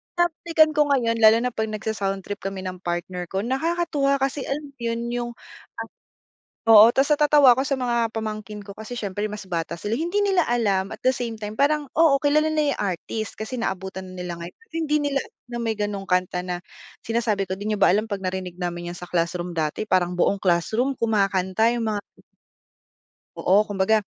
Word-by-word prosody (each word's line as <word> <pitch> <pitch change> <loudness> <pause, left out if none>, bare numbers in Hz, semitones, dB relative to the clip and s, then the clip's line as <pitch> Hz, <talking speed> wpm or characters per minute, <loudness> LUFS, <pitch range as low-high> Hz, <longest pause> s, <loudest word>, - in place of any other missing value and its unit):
binabalikan 330 -2 +3
ko 300 - +5
ngayon 230 -4 +1
lalo 220 0 +7
na 250 - +1
'pag 220 -1 -2
nagsa-soundtrip 200 -2 -3
kami 195 -1 -3
ng 185 -1 -5
partner 175 +1 -3
ko, 190 +3 -2
nakakatuwa 280 +1 0
kasi, 270 +1 -1
alam 290 +1 -3
yun, 235 0 -2
yung, 240 0 -2 0.5
ah, - - -7 0.8
oo, 220 -1 +10
tas 270 +1 +2
natatawa 295 -4 +6
ako 265 - +1
sa 275 -1 0
mga 235 -2 0
pamangkin 215 -1 -5
ko 200 0 -11
kasi 220 +3 -8
siyempre 205 0 -3
mas 210 -2 -7
bata 170 -1 -2
sila, 210 +3 -1
hindi 345 +8 0
nila 385 -4 +3
alam 200 -5 +1
at - - -9
the 255 - +4
same 235 -2 -3
time 210 +1 -6
parang, 290 0 +2
oo, 295 -4 +5
kilala 300 +1 +3
nila 300 -2 +1
yung - - -3
artist 215 +5 -5
kasi 235 +4 -4
naabutan 190 -3 -4
na - - -10
nila 180 -1 -4
ngayon. 170 +1 -9 0.2
Hindi 315 -2 +1
nila 275 -1 0
alam - - -22
na 240 - -4
may 225 - +1
gano'ng 205 -2 -2
kanta 180 -1 +1
na 180 -1 -3 0.5
sinasabi 220 -4 0
ko 185 - -2
di 205 +2 -4
nyo 210 - -2
ba - - +6
alam 210 +3 +2
'pag 200 -3 -4
narinig 185 -1 -4
namin 175 -1 -3
yan 175 - -9
sa 180 - -8
classroom 175 0 -2
dati 160 +7 -2
parang 180 -2 +2
buong 200 - +3
classroom 210 +9 +1
kumakanta, 200 0 +2
yung 235 -2 -1
mga 210 -1 -1 1.4
Oo, 200 +3 +3
kumbaga 205 +1 +1
215 Hz, 190 wpm, -24 LUFS, 190-265 Hz, 1.4 s, oo